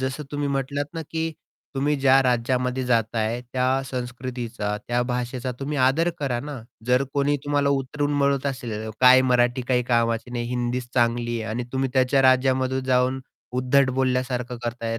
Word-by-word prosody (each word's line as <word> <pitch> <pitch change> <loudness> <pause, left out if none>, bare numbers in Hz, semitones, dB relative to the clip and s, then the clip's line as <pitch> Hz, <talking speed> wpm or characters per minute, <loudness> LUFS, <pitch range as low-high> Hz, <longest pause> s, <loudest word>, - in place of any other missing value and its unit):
जसं 130 +3 -3
तुम्ही 145 -1 -2
म्हटलात 140 +1 -2
ना, 165 - -3
की 160 +1 -3 0.4
तुम्ही 145 +2 +1
ज्या 135 0 +6
राज्यामध्ये 125 +1 0
जाताय 115 -1 0
त्या 125 0 +1 0.2
संस्कृतीचा, 120 -4 -4
त्या 120 +2 -1
भाषेचा 125 +1 -3
तुम्ही 145 +2 -3
आदर 145 +7 +3
करा 135 -5 -1
ना, 145 -2 -7 0.3
जर 125 +2 +3
कोणी 145 +1 +2
तुम्हाला 145 -1 +1
उतरून 140 +2 -1
म्हणत 140 0 +1
असेल, 115 -5 -4
काय 130 0 +8
मराठी 120 0 +2
काही 125 -1 +2
कामाची 115 -1 +1
नाही, 120 -1 -3
हिंदीच 125 0 -2
चांगली 120 -1 +1
आहे 110 - -4
आणि 120 +3 -2
तुम्ही 135 0 0
त्याच्या 130 +1 +3
राज्यामध्ये 130 0 +3
जाऊन 130 +1 +2 0.4
उद्धट 130 +1 +3
बोलल्यासारखं 125 -1 -1
करताय. 115 -1 -3
130 Hz, 155 wpm, -24 LUFS, 120-135 Hz, 0.4 s, काय